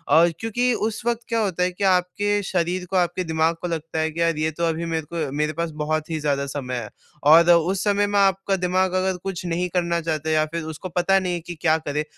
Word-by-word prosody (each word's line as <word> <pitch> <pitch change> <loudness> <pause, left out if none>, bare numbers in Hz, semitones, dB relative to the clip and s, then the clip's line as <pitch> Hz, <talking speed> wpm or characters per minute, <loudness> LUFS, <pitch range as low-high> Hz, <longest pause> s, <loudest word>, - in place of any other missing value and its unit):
और 170 +2 +6
क्योंकि 245 +2 0
उस 220 -1 -2
वक़्त 235 0 0
क्या 230 - 0
होता 185 -5 0
है 180 - +1
कि 190 +3 -6
आपके 195 +2 +2
शरीर 180 0 -1
को 190 - -3
आपके 175 +1 +1
दिमाग 160 0 +1
को 180 - -2
लगता 160 -1 -3
है 160 0 0
कि, 165 - -7
"यार 165 -2 +2
ये 155 +1 0
तो 170 +2 -2
अभी 165 0 -1
मेरे 160 -2 -2
को 160 -5 -2
मेरे 150 +1 0
पास 170 +1 -3
बहुत 155 +1 -1
ही 160 - -2
ज़्यादा 140 -2 0
समय 130 -2 -4
है।" 115 -4 -5 0.3
और 165 +4 +7
उस 175 +3 +2
समय 205 0 +2
में 205 0 0
आपका 195 0 +2
दिमाग 185 0 0
अगर 185 0 0
कुछ 190 -2 -4
नहीं 175 +1 -1
करना 170 -1 +1
चाहते 160 -1 -2
या 155 0 +3
फिर 170 -1 -2
उसको 185 +5 -7
पता 180 +3 +2
नहीं 180 -2 -2
है 175 - -2
कि 175 +1 -8
क्या 160 -1 +3
करें, 150 -1 -3
170 Hz, 245 wpm, -23 LUFS, 160-190 Hz, 0.3 s, और